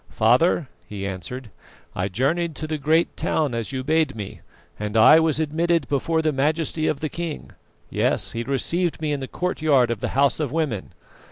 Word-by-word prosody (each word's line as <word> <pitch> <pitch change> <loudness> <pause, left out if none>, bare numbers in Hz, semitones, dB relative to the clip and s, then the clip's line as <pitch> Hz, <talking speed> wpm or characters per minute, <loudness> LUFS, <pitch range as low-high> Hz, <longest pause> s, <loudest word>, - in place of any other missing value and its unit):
"Father," 130 +8 +3 0.2
he 100 -2 -5
answered, 105 +5 -6 0.4
"I 90 +1 -1
journeyed 150 - 0
to 155 - -5
the 155 -1 -3
great 160 +4 +2
town, 150 -5 0
as 115 +1 -3
you 130 -1 -3
bade 160 +1 +1
me, 105 -3 -7 0.4
and 105 +1 -2
I 130 +8 +8
was 160 -2 +1
admitted 160 -1 +1
before 160 +3 0
the 155 - +2
majesty 155 +3 0
of 140 - -1
the 155 - -1
king; 165 0 -5 0.4
yes, - - 0
he 115 - -3
received 160 +7 -1
me 155 -1 -1
in 145 - -1
the 135 - -5
courtyard 150 -9 +1
of 115 - -2
the - - -2
House 140 0 +3
of 150 -5 -1
Women. 145 - -2
145 Hz, 185 wpm, -23 LUFS, 120-160 Hz, 0.4 s, I